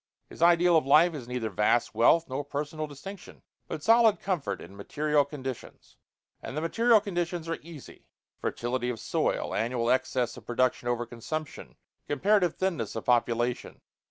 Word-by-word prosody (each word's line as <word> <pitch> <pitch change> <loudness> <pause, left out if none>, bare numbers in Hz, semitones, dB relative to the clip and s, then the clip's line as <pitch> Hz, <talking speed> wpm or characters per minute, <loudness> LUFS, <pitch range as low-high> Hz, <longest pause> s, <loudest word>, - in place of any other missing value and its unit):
His - - -12
ideal 175 0 +5
of 155 - +1
life 160 +5 +5
is 135 -6 -7
neither 125 -3 -3
vast 105 +3 +1
wealth 160 +9 +4
nor 135 +2 -3
personal 150 +2 -4
distinction, 185 +8 -11 0.2
but 155 - -6
solid 225 -1 +5
comfort 170 - -2
in 95 +3 -12
material 150 +8 +1
conditions, 135 -3 -8 0.5
and 145 - -7
the - - -1
material 230 +7 +4
conditions 175 -4 -3
are 165 -1 -3
easy: 160 -3 -13 0.3
fertility 125 +1 -2
of 120 -3 -4
soil, - - -1
annual 120 0 0
excess 125 -2 0
of - - -13
production 120 0 0
over 120 0 -1
consumption, 145 +7 -6 0.3
comparative 180 +2 +2
thinness 170 - -2
of 110 - -5
population. 120 0 0
145 Hz, 155 wpm, -28 LUFS, 120-170 Hz, 0.5 s, ideal